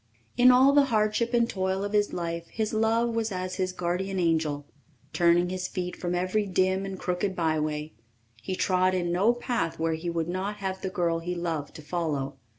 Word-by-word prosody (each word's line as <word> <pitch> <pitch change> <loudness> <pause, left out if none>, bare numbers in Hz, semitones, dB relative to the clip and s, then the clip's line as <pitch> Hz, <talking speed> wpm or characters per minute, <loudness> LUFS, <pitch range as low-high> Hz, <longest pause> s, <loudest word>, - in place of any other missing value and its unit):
In 250 +1 +6
all 260 +2 +6
the 285 -1 +6
hardship 220 -1 +1
and 235 -1 +3
toil 190 -2 -1
of 205 +1 -4
his 205 -1 +2
life 170 -1 -4
his 220 -1 -3
love 225 +2 +2
was 225 -1 -1
as 185 0 -4
his 185 -1 0
guardian 185 +2 -2
angel, 160 -4 0 0.5
turning 175 +1 +3
his 185 0 -3
feet 180 -1 -4
from 175 0 -3
every 185 +4 0
dim 185 +1 +1
and 190 -1 -5
crooked 185 +2 -2
byway; 155 -2 -1 0.5
he 185 - -3
trod 185 0 +2
in 175 -1 -1
no 195 +6 +4
path 240 -8 -2
where 165 0 0
he 160 +2 -3
would 165 -1 -1
not 190 +4 -2
have 190 -2 -4
the 190 - -2
girl 170 -2 0
he 175 +2 -4
loved 165 -4 -3
to 155 - -10
follow. 145 -5 -2
185 Hz, 195 wpm, -27 LUFS, 170-205 Hz, 0.5 s, In